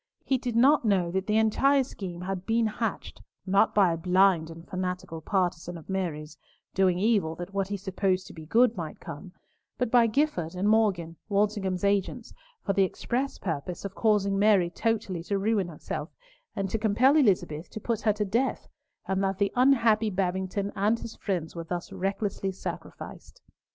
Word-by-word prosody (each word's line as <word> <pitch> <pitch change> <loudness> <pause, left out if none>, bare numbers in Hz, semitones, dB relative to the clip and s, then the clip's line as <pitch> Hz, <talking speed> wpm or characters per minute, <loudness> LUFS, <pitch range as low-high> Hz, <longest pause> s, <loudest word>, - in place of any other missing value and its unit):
He 265 -2 +1
did 245 -2 -3
not 270 +5 +5
know 190 -6 +2
that 190 +1 -2
the 210 0 +2
entire 270 +6 +3
scheme 185 -8 -7
had 185 0 -4
been 230 0 +2
hatched, 220 -1 -3 0.2
not 200 +3 +3
by 190 -5 +5
a - - -3
blind 180 -1 +3
and 165 +1 -11
fanatical 180 -2 -4
partisan 175 -1 -1
of 165 +3 -10
Mary's, 155 -5 -3 0.4
doing 185 -2 +3
evil 195 -5 +1
that 175 +3 -8
what 195 -1 0
he 200 0 -3
supposed 190 -1 -1
to - - -11
be 160 -2 -11
good, 235 +5 +4
might 165 -5 -6
come, 180 +6 -9 0.5
but 250 -3 -1
by 240 -2 +5
Gifford 215 - 0
and 190 +3 0
Morgan, 195 -7 +2
Walsingham's 200 -3 0
agents, 200 -1 0 0.3
for 195 - +1
the 195 - +2
express 250 +8 -1
purpose 170 +1 -4
of 195 - -5
causing 200 -3 +2
Mary 200 -4 +4
totally 215 -5 -1
to 200 - 0
ruin 200 -2 +1
herself, 165 -3 -6 0.5
and 195 -1 -1
to 225 - -1
compel 230 +6 +4
Elizabeth 185 - +2
to - - -7
put 225 0 -2
her 215 - +2
to 210 0 -2
death, 235 +7 -1 0.4
and 190 0 0
that 195 -1 0
the 200 0 +1
unhappy 235 -4 +4
Babington 190 +1 -2
and 210 +3 +2
his 230 - -8
friends 175 -6 -3
were 170 - -4
thus 175 +2 -5
recklessly 195 +1 -2
sacrificed. 190 - -8
195 Hz, 175 wpm, -27 LUFS, 180-220 Hz, 0.5 s, not